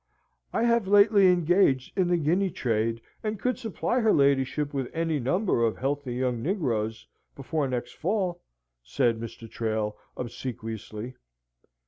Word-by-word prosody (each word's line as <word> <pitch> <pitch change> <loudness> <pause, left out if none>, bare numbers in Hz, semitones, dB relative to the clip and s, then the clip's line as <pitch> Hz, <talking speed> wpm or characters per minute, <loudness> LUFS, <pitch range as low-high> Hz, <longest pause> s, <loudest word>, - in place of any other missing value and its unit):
"I - - 0
have 235 -3 +2
lately 200 0 +6
engaged 175 -6 +3
in 185 -2 +2
the 175 0 +2
Guinea 175 +5 +1
trade, 115 -5 -1 0.2
and 215 -1 -2
could 250 0 -1
supply 240 +1 -1
her 220 -2 +3
ladyship 140 +1 +2
with 135 -3 -2
any 165 -2 0
number 155 - +1
of 115 -1 +1
healthy 135 -1 -2
young 125 -2 -1
negroes 115 - -1 0.3
before 145 +1 -2
next 125 -2 -3
fall," 180 -1 -1 0.4
said 115 - 0
Mr. 115 0 -8
Trail, 110 -2 -2 0.2
obsequiously. 115 -1 -6
140 Hz, 135 wpm, -27 LUFS, 115-185 Hz, 0.4 s, lately